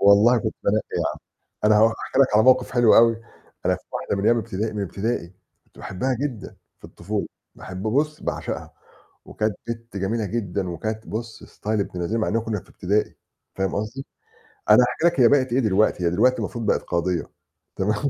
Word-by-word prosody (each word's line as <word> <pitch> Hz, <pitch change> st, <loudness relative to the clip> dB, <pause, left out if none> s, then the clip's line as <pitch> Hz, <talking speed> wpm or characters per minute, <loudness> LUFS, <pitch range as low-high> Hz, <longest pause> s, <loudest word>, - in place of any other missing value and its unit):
والله 105 Hz, +5 st, +6 dB
كنت 110 Hz, -1 st, -3 dB
بانقّي 105 Hz, +2 st, +1 dB
يا -, -, 0 dB
عم، -, -, -11 dB, 0.5 s
أنا 105 Hz, 0 st, +5 dB
هاحكي 115 Hz, +4 st, +1 dB
لك 130 Hz, -6 st, +4 dB
على 110 Hz, -, +6 dB
موقف 130 Hz, -1 st, +4 dB
حلو 120 Hz, -3 st, +5 dB
أوي، 115 Hz, 0 st, +6 dB, 0.5 s
أنا -, -, +3 dB
في -, -, -18 dB
واحدة -, -, -2 dB
من 100 Hz, -, -2 dB
أيام 120 Hz, -, +4 dB
ابتدائي 110 Hz, 0 st, -3 dB
من 105 Hz, -1 st, -3 dB
ابتدائي 100 Hz, -1 st, -3 dB, 0.3 s
كنت -, -, -25 dB
باحبها 125 Hz, +8 st, -2 dB
جدًا 130 Hz, -8 st, -5 dB, 0.2 s
في -, -, -24 dB
الطفولة، -, -, -4 dB, 0.3 s
باحب 95 Hz, 0 st, -8 dB
بُصّ 145 Hz, +8 st, 0 dB
باعشقها، -, -, -4 dB, 0.5 s
وكانت 110 Hz, -1 st, -2 dB
بِت 115 Hz, -2 st, -6 dB
جميلة 105 Hz, +4 st, -1 dB
جدًا 95 Hz, -4 st, -2 dB
وكانت 110 Hz, +6 st, -4 dB
بُصّ 110 Hz, +1 st, -6 dB
ستايل 110 Hz, 0 st, -3 dB
ابن 90 Hz, -3 st, -4 dB
لذينة 110 Hz, +7 st, -1 dB
مع -, -, 0 dB
إن 115 Hz, +1 st, +1 dB
كنّا 110 Hz, -3 st, -3 dB
في -, -, -22 dB
ابتدائي 100 Hz, +3 st, -1 dB, 0.4 s
فاهم 95 Hz, 0 st, -1 dB
قصدي، 115 Hz, +6 st, -4 dB, 0.6 s
أنا 125 Hz, -, +8 dB
هاحكي 125 Hz, +6 st, -1 dB
لك 170 Hz, -4 st, 0 dB
هي 120 Hz, -, +7 dB
بقِت 130 Hz, -2 st, +3 dB
إيه 130 Hz, -, +3 dB
دلوقتي، 105 Hz, -4 st, +2 dB
هي 85 Hz, -, +4 dB
دلوقتي 120 Hz, +9 st, +3 dB
المفروض 115 Hz, -3 st, -4 dB
بقِت -, -, +2 dB
قاضية 85 Hz, 0 st, -1 dB, 0.5 s
تمام؟ 110 Hz, +8 st, 0 dB
110 Hz, 190 wpm, -23 LUFS, 100-120 Hz, 0.6 s, أنا